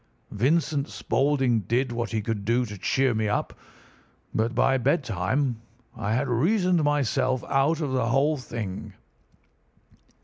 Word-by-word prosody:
Vincent 145 +4 +1
Spaulding 135 -4 +1
did 125 +3 +1
what 120 -2 -2
he 110 -2 -2
could 105 -2 -3
to 120 +2 +2
cheer 130 +6 +1
me 110 0 0
up, 105 - -1 0.8
but 115 +2 0
by 135 +2 +3
bedtime 125 - 0 0.3
I 110 0 -1
had 135 +4 0
reasoned 175 - +2
myself 130 -3 +1
out 145 +4 +1
of 145 -3 -2
the 125 -3 0
whole 140 +5 +2
thing. 110 -7 -6
130 Hz, 130 wpm, -26 LUFS, 115-145 Hz, 0.8 s, by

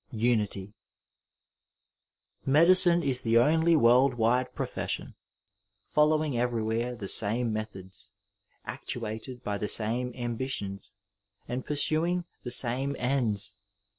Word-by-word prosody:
UNITY 105 -4 -1 1.7
Medicine 170 +4 +5
is 130 -3 0
the 115 0 +2
only 160 +7 +4
world 125 -1 +4
wide 120 +2 +1
profession, - - -3 0.8
following 150 -2 +2
everywhere 120 0 -1
the 105 -4 -6
same 110 +4 0
methods, 100 -3 -7 0.6
actuated 120 +1 -6
by 100 -1 -3
the 105 - -2
same 120 +4 0
ambi 120 +1 -4
tions, 100 -5 -5 0.5
and 125 +1 -4
pursuing 165 +4 0 0.2
the 125 - -4
same 130 +3 0
ends. 120 -4 -1
120 Hz, 105 wpm, -28 LUFS, 110-140 Hz, 1.7 s, Medicine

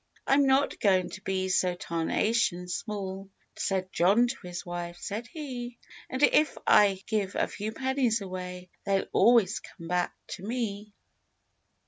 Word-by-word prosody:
"I'm 275 0 +4
not 270 +1 +2
going 185 -3 +2
to 190 - -8
be 190 -1 -1
so 180 -1 +2
tarnation 180 +3 0
small," 195 0 -4 0.3
Said 190 -1 -1
John 200 +8 +4
to 245 -6 -5
his 175 0 -6
wife, 175 0 -5
said 220 +5 -5
he— 245 -5 -6 0.3
"And 260 +2 -2
if 300 0 +4
I 195 -2 +5
give 205 -3 -1
a - - +1
few 215 +1 -5
pennies 260 -2 +1
away 180 -2 -7
They'll 195 -1 +1
always 230 -4 +4
come 165 -3 -12
back 180 +1 0
to 190 - -7
me." 210 -2 -4
200 Hz, 145 wpm, -28 LUFS, 185-235 Hz, 0.3 s, I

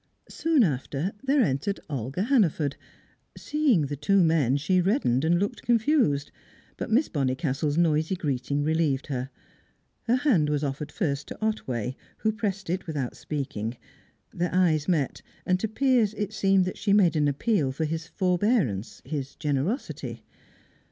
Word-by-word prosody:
Soon 320 -6 +2
after, 145 +2 -1
there 275 0 +3
entered 140 +7 -1
Olga 135 - -3
Hannaford. 185 - +2 0.6
Seeing 290 - +2
the 145 +1 -3
two 180 +7 +3
men, 150 -5 +3
she 180 +6 +2
reddened 175 - +1
and 170 +2 +3
looked 200 +3 -2
confused, 230 - +2 0.4
but - - -5
Miss 255 +7 +3
Bonnicastle's 145 +1 -1
noisy 160 +1 +2
greeting 140 -3 -1
relieved 155 -3 +1
her. 130 -2 -3 0.8
Her 235 - +4
hand 245 - +2
was 150 0 0
offered 145 +1 -3
first 150 -7 -2
to - - -8
Otway, 130 - -2 0.2
who 220 - +1
pressed 205 -3 -3
it 180 +3 -2
without 145 -6 -3
speaking; 125 -6 -4 0.6
their 175 0 -1
eyes 165 -5 +2
met, 155 -7 0 0.2
and 185 0 +2
to 220 - -1
Piers 230 -2 +2
it 210 0 -3
seemed 195 -2 +3
that 185 - -5
she 200 -1 +1
made 190 -5 +4
an 150 -1 +2
appeal 145 - +1
for 155 +4 -2
his 160 +1 -3
forbearance, 180 - 0
his 140 -3 -4
generosity. 150 - -3
165 Hz, 150 wpm, -26 LUFS, 140-205 Hz, 0.8 s, Her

